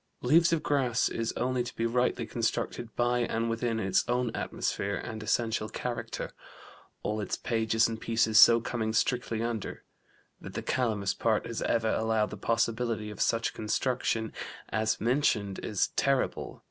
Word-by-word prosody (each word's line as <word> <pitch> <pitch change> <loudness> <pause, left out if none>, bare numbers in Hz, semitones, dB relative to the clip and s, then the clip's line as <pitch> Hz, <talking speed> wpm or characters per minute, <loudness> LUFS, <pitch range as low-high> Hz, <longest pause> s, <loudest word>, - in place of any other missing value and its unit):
Leaves 165 +2 +5
of 165 -2 +1
Grass 125 -4 +2
is 115 0 -2
only 125 +1 0
to 120 - -5
be 115 - -1
rightly 125 +2 +1
construed 115 0 -2
by 120 0 +2
and 115 -1 0
within 115 0 -1
its 95 -3 +2
own 125 -1 +1
atmosphere - - -2
and 110 -1 -5
essential 110 0 0
character 125 -1 -4 0.7
all 105 0 -1
its 100 - -2
pages 115 -1 +2
and 115 -1 -5
pieces 110 -1 +3
so 115 0 +9
coming 110 -1 -2
strictly 115 -1 0
under. 115 -3 -4 0.6
That - - -10
the - - -3
'Calamus' 110 -6 0
part 110 -2 +1
has 115 -1 -4
ever 115 -1 +1
allowed 110 -1 +1
the - - -6
possibility 115 -1 0
of 105 - -7
such 115 0 +1
construction 110 0 -1 0.4
as 110 0 0
mentioned 110 -5 +1
is 105 - 0
terrible. 135 -1 0
115 Hz, 155 wpm, -29 LUFS, 110-120 Hz, 0.7 s, so